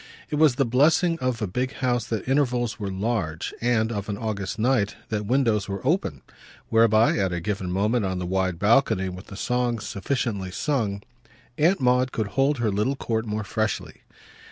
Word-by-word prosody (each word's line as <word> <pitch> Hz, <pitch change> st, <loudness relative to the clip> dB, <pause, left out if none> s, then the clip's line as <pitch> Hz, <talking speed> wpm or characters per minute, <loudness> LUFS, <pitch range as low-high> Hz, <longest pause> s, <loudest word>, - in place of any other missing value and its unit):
It 150 Hz, -, 0 dB
was 150 Hz, -4 st, +5 dB
the 135 Hz, -, +2 dB
blessing 160 Hz, +7 st, +3 dB
of 125 Hz, -3 st, -1 dB
a -, -, 0 dB
big 125 Hz, +8 st, -2 dB
house 120 Hz, -3 st, 0 dB
that 110 Hz, -2 st, -3 dB
intervals 125 Hz, -4 st, +1 dB
were 100 Hz, -2 st, -3 dB
large 95 Hz, -5 st, -2 dB
and, 115 Hz, -2 st, +1 dB
of 105 Hz, -2 st, -4 dB
an 100 Hz, -, -2 dB
August 105 Hz, -2 st, -3 dB
night, 115 Hz, -2 st, +1 dB
that 105 Hz, -2 st, -2 dB
windows 115 Hz, -5 st, +1 dB
were 100 Hz, +4 st, -5 dB
open; 135 Hz, -, 0 dB, 0.5 s
whereby, 110 Hz, -1 st, +4 dB
at 95 Hz, -2 st, +1 dB
a 90 Hz, -, -2 dB
given 95 Hz, -1 st, -3 dB
moment, 105 Hz, +5 st, +1 dB
on 95 Hz, -1 st, -1 dB
the 90 Hz, -, -3 dB
wide 95 Hz, -1 st, 0 dB
balcony, 100 Hz, -1 st, +3 dB
with 90 Hz, +1 st, -9 dB
the 100 Hz, -, -9 dB
songs 120 Hz, -2 st, -1 dB
sufficiently 100 Hz, -3 st, -2 dB
sung, 105 Hz, -, -1 dB, 0.6 s
Aunt 175 Hz, +6 st, +4 dB
Maud 125 Hz, 0 st, +2 dB
could 110 Hz, -3 st, -2 dB
hold 135 Hz, +5 st, +1 dB
her 115 Hz, -3 st, 0 dB
little 105 Hz, +8 st, 0 dB
court 110 Hz, -3 st, -2 dB
more 105 Hz, 0 st, -2 dB
freshly. 110 Hz, +2 st, -3 dB
110 Hz, 180 wpm, -25 LUFS, 100-125 Hz, 0.6 s, was